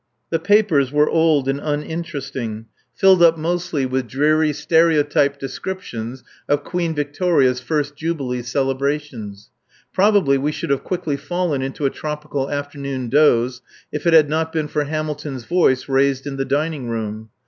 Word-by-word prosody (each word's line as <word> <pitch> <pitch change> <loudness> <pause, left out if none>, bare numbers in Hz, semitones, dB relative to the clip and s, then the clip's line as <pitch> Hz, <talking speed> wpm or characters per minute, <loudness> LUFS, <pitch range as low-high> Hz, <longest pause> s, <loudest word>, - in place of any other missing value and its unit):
The 165 - +1
papers 175 -7 +3
were 150 +1 +3
old 160 -4 +2
and 135 +1 0
uninteresting, 145 -7 -4 0.3
filled 190 -2 +5
up 165 -1 +6
mostly 170 -3 -1
with 130 -1 -2
dreary 150 +5 +2
stereotyped 150 -2 +2
descriptions 130 -5 -6 0.3
of 145 0 +2
Queen 170 -1 -2
Victoria's 145 -3 +1
first 145 +2 -2
jubilee 140 -6 -3
celebrations. 135 -4 -3 0.4
Probably 190 -9 +3
we 145 +3 0
should 145 - -4
have 140 - 0
quickly 175 -6 -2
fallen 175 -4 -2
into 135 +2 -3
a 135 - +2
tropical 150 -2 -4
afternoon 140 -3 -4
doze 125 -3 +3 0.3
if 150 +3 -3
it 170 - +4
had 155 -2 +7
not 160 +2 -1
been 160 -2 -1
for 150 0 -1
Hamilton's 150 -3 -4
voice 150 -5 +2
raised 135 0 +1
in 140 -1 -5
the 135 - -1
dining 145 -3 -1
room. 110 -1 -4
145 Hz, 150 wpm, -20 LUFS, 135-160 Hz, 0.4 s, had